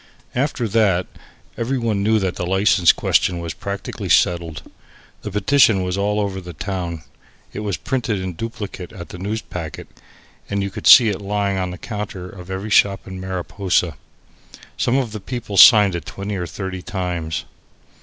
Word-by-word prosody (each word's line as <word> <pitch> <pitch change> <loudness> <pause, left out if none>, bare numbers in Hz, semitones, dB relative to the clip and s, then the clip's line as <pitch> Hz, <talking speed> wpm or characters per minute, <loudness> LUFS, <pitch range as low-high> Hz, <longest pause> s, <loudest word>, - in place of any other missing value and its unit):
After 125 -2 -1
that, 100 -4 +2 0.5
every 125 +4 -1
one 110 -4 0
knew 110 +2 +3
that 95 -3 -1
the - - -4
license 95 -2 +4
question 90 - +1
was 85 -1 -4
practically 100 -1 -5
settled. 85 -3 +2 0.6
The - - -5
petition 105 0 +3
was 90 0 -2
all 105 +1 0
over 100 -2 -2
the 90 -1 -9
town. 85 -2 -4 0.5
It - - -5
was 105 -3 -2
printed 120 -6 -2
in 95 -1 -4
duplicate 105 -3 -6
at 85 - -9
the 90 - -9
Newspacket 95 -5 -5 0.6
and 100 0 -1
you 100 - -3
could - - -4
see 120 -5 +9
it 100 -1 -3
lying 100 -1 -1
on 90 -1 -2
the 90 - -7
counter 105 -4 -6
of 90 -1 -11
every 95 +3 -4
shop 100 -1 +3
in 95 -1 -8
Mariposa. 95 -2 -1 0.8
Some 125 - +1
of 125 -5 -1
the 110 - -5
people 120 -3 -5
signed 105 -2 +8
it 85 -4 -5
twenty 100 +1 -5
or 90 -2 -3
thirty 95 -1 -5
times. 90 -4 -3
100 Hz, 170 wpm, -20 LUFS, 90-105 Hz, 0.8 s, see